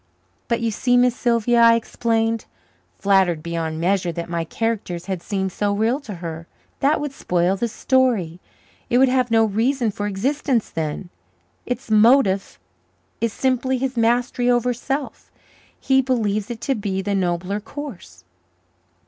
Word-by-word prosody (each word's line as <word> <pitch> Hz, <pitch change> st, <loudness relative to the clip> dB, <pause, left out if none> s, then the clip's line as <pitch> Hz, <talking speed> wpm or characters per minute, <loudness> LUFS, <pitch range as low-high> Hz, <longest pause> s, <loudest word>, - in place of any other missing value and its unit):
"But, 235 Hz, -1 st, 0 dB
you 230 Hz, -1 st, 0 dB
see, 245 Hz, +3 st, +2 dB
Miss 245 Hz, -1 st, +3 dB
Sylvia," 235 Hz, -1 st, +2 dB
I 230 Hz, 0 st, +7 dB
explained, 225 Hz, -1 st, -1 dB, 0.5 s
flattered 185 Hz, -, +2 dB
beyond 165 Hz, -2 st, -3 dB
measure 180 Hz, 0 st, +1 dB
that 170 Hz, +1 st, -6 dB
my 170 Hz, -1 st, -1 dB
characters 190 Hz, -3 st, -3 dB
had 190 Hz, -2 st, -3 dB
seemed 190 Hz, 0 st, -2 dB
so 205 Hz, +2 st, -1 dB
real 225 Hz, +6 st, +1 dB
to 220 Hz, -9 st, -8 dB
her, 165 Hz, -1 st, -7 dB, 0.3 s
"that 280 Hz, +3 st, +2 dB
would 295 Hz, -1 st, -3 dB
spoil 180 Hz, -5 st, 0 dB
the 235 Hz, +5 st, -1 dB
story. 230 Hz, -9 st, +1 dB, 0.5 s
It 240 Hz, -, +3 dB
would 265 Hz, 0 st, +5 dB
have 255 Hz, -1 st, +1 dB
no 225 Hz, -1 st, +4 dB
reason 230 Hz, +3 st, 0 dB
for 205 Hz, +1 st, -4 dB
existence 245 Hz, +4 st, -1 dB
then. 160 Hz, +3 st, -4 dB, 0.6 s
Its 250 Hz, -2 st, -4 dB
motif 215 Hz, -3 st, +4 dB, 0.6 s
is 230 Hz, -1 st, 0 dB
simply 260 Hz, +2 st, 0 dB
his 260 Hz, 0 st, -2 dB
mastery 245 Hz, +1 st, +1 dB
over 245 Hz, 0 st, +2 dB
self. 270 Hz, +3 st, -4 dB, 0.5 s
He 265 Hz, 0 st, +3 dB
believes 215 Hz, -6 st, -1 dB
it 235 Hz, -2 st, -6 dB
to 275 Hz, -, 0 dB
be 200 Hz, -4 st, -3 dB
the 200 Hz, +1 st, -1 dB
nobler 185 Hz, +1 st, -1 dB
course." 210 Hz, -, -9 dB
225 Hz, 150 wpm, -21 LUFS, 190-245 Hz, 0.6 s, I